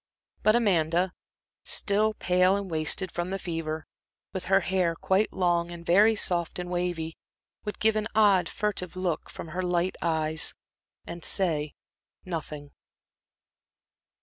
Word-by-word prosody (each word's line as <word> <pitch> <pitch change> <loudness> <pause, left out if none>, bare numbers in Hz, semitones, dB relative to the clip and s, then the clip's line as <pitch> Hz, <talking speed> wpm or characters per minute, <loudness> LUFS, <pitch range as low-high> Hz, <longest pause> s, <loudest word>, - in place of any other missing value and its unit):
But 215 +1 +4
Amanda, 180 -5 +2 0.5
still 215 +1 +2
pale 185 0 +3
and 200 -2 -4
wasted 160 +3 +1
from 175 +1 -3
the 195 - -2
fever 165 -3 -4 0.5
with 190 - -4
her 195 +1 +4
hair 180 -2 0
quite 190 +5 +1
long 175 -2 +1
and 170 -1 -9
very 210 +6 +5
soft 175 -5 0
and 180 0 -5
wavy, 175 -2 -2 0.5
would 210 - -4
give 220 0 +3
an 215 0 0
odd, 200 -5 +4
furtive 195 -4 -3
look 180 -4 -2
from 165 - -8
her 180 +4 -3
light 180 0 0
eyes 160 -2 0 0.5
and 170 0 -7
say 155 -6 +1 0.5
nothing. 150 -4 -6
180 Hz, 135 wpm, -27 LUFS, 165-195 Hz, 0.5 s, very